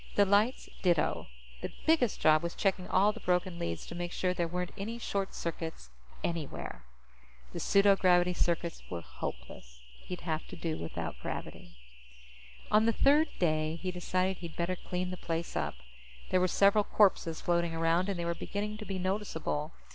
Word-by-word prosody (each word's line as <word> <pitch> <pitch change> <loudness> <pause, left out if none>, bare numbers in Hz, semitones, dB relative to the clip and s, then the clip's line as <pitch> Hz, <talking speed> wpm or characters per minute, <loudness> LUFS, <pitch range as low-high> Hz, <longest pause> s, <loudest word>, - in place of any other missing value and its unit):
The 205 - +6
lights 205 +6 +2
ditto. 150 - +2 0.3
The - - -4
biggest 310 -9 +3
job 155 0 +5
was 170 0 -4
checking 190 -2 0
all 200 +3 +4
the - - -9
broken 180 -1 0
leads 85 -1 -3
to - - -8
make 175 0 -4
sure 180 0 0
there 175 -2 0
weren't 180 +1 -3
any 215 +3 -4
short 200 -4 -2
circuits 160 - -5 0.3
anywhere. 160 - -4 0.7
The - - -4
pseudogravity 185 -3 +4
circuits 170 -1 0
were 85 -2 -4
hopeless. - - -8 0.2
He'd 180 -1 -7
have 160 -2 -3
to - - -8
do 165 -2 -3
without 85 - -5
gravity. - - -6 0.9
On 215 +1 +5
the 230 - +4
third 295 +7 +5
day, 155 -2 +1
he 185 +2 -3
decided 185 +1 0
he'd 170 -2 -8
better 175 +2 -1
clean 180 0 -3
the 185 - -5
place 165 0 -3
up. 75 -3 -1 0.6
There 185 - +4
were 185 - +4
several 200 +3 +4
corpses 190 -6 +3
floating 170 -1 +1
around, 165 +3 +2
and 195 - -1
they 170 - -2
were 170 - 0
beginning 210 +4 -4
to 215 - -6
be 195 -2 -3
noticeable. 180 -5 -2
180 Hz, 170 wpm, -31 LUFS, 165-195 Hz, 0.9 s, The